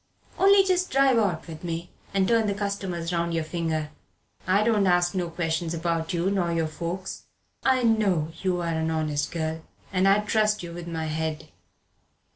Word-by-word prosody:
Only 395 0 +6
just 370 -1 +1
drive 270 -2 +4
out 185 -7 0
with 160 0 -9
me 170 0 -4 0.2
and 195 -1 +2
turn 230 -2 +3
the 200 - 0
customers 190 -4 -3
round 170 0 0
your 165 - 0
finger. 160 -2 -2 0.6
I 195 +3 +4
don't 215 -3 +3
ask 175 0 +3
no 180 -3 -1
questions 165 0 -2
about 165 -1 -1
you 175 +2 0
nor 180 -4 0
your 165 -1 +1
folks. 170 +4 -5 0.3
I 260 -1 +2
know 200 -9 +2
you're 180 -2 0
an 160 -1 -1
honest 155 -2 -1
girl, 160 -1 -3 0.3
and 185 +1 +3
I'd 205 +2 +3
trust 210 -2 +2
you 170 -1 -7
with 175 0 -7
my 165 -1 -3
head. 155 0 -3
175 Hz, 175 wpm, -26 LUFS, 165-200 Hz, 0.6 s, Only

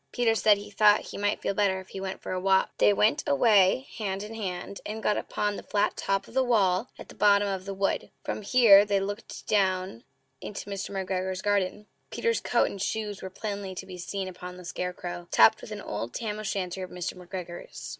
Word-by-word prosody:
Peter 240 -2 +2
said 215 -2 +4
he 205 +1 -9
thought 210 0 +5
he - - -8
might 205 0 0
feel - - 0
better 195 -2 +1
if 190 - -12
he 195 - -7
went 190 0 -5
for - - -5
a 185 - -1
walk. 190 0 +3
They - - +6
went 215 +8 +2
away 210 - +4
hand 195 -2 -2
in 215 +2 -8
hand, 195 -3 -5
and 220 +1 -6
got 210 - +2
upon 205 -1 -2
the - - -6
flat 205 - 0
top 195 0 -1
of - - -15
the 265 +1 +3
wall 210 -4 +2
at - - -10
the - - -12
bottom 205 0 +4
of 190 -1 -3
the 195 - -4
wood. 195 0 -1
From - - -3
here 210 -2 +7
they 205 -1 +1
looked 205 +3 -6
down 185 - 0 0.4
into 205 0 -7
Mr. 195 -1 -4
McGregor's 190 -1 -3
garden. 205 0 0 0.2
Peter's 465 -1 0
coat - - +2
and 200 - -7
shoes 210 -1 -3
were 190 - -6
plainly 200 -1 -5
to 190 - -6
be 185 -1 -9
seen 190 +2 -4
upon 180 0 -8
the 180 - -11
scarecrow, 180 -1 -5
topped 220 -1 +6
with - - -9
an 210 -1 -6
old 115 - -5
tam 215 -2 -3
o' - - -4
shanter 190 -3 -3
of 185 - -7
Mr. 180 -1 -4
McGregor's. 180 -1 -8
195 Hz, 220 wpm, -27 LUFS, 185-210 Hz, 0.4 s, here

